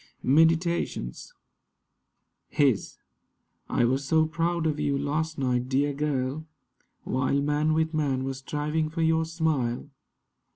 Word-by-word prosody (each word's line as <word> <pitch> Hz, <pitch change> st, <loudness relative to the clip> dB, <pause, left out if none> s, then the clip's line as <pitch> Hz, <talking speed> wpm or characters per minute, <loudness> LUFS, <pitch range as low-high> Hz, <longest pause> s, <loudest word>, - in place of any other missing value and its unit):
MEDITATIONS 160 Hz, -, +1 dB, 1.2 s
HIS 135 Hz, -8 st, +1 dB, 0.7 s
I -, -, +2 dB
WAS 130 Hz, +3 st, +1 dB
so 160 Hz, +3 st, +3 dB
proud 165 Hz, +1 st, -1 dB
of 155 Hz, -1 st, 0 dB
you 140 Hz, -1 st, 0 dB
last 155 Hz, +3 st, -2 dB
night, 125 Hz, -2 st, 0 dB
dear 140 Hz, +2 st, +1 dB
girl, 145 Hz, +1 st, -2 dB, 0.6 s
While 130 Hz, +2 st, 0 dB
man 150 Hz, +2 st, +1 dB
with 160 Hz, +1 st, 0 dB
man 140 Hz, -4 st, 0 dB
was 135 Hz, 0 st, -4 dB
striving 150 Hz, +3 st, -2 dB
for 165 Hz, +1 st, -2 dB
your 160 Hz, 0 st, +2 dB
smile. 150 Hz, -5 st, -1 dB
150 Hz, 120 wpm, -27 LUFS, 135-160 Hz, 1.2 s, so